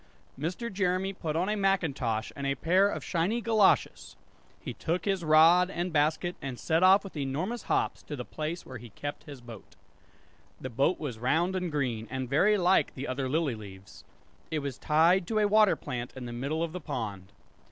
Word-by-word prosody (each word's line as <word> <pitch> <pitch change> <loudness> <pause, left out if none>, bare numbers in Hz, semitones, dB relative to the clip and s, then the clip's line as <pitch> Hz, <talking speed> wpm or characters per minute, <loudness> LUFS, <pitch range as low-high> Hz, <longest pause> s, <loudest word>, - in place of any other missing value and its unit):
Mr. 185 - -4
Jeremy 185 0 0
put 160 -5 -4
on 175 +3 0
a 210 - 0
macintosh, 145 - 0
and 140 -1 -3
a 140 - 0
pair 185 +8 +3
of - - -4
shiny 180 +7 0
goloshes; 220 -4 +2 0.4
he - - -6
took 170 +2 -2
his 195 -3 0
rod 165 +4 +6
and 175 -2 -3
basket, 155 +4 +1
and 135 -2 -5
set 160 +1 +1
off 190 +2 +6
with 195 - -10
enormous 155 - -3
hops - - 0
to 150 - -7
the 125 -3 -6
place 160 +3 -5
where 130 -2 -8
he 120 +1 -11
kept 145 +8 -7
his 140 -4 -10
boat. 115 -4 -12 0.8
The 130 - -6
boat 135 +9 +1
was 130 -8 -5
round 160 +10 +1
and 180 -2 -2
green, 125 -7 -2
and 130 0 -3
very 190 - +3
like 185 0 +2
the 140 +2 -5
other 130 0 -2
lily 155 -2 0
leaves. 100 -3 -12 0.5
It 160 - -2
was 135 -3 -5
tied 170 +4 +3
to 220 - -1
a 210 -1 +3
water 215 0 +5
plant 120 -1 -6
in 130 -2 -7
the 120 - -6
middle 140 +7 -2
of 165 - -3
the 180 +1 -6
pond. 100 -8 -5
160 Hz, 195 wpm, -29 LUFS, 130-185 Hz, 0.8 s, rod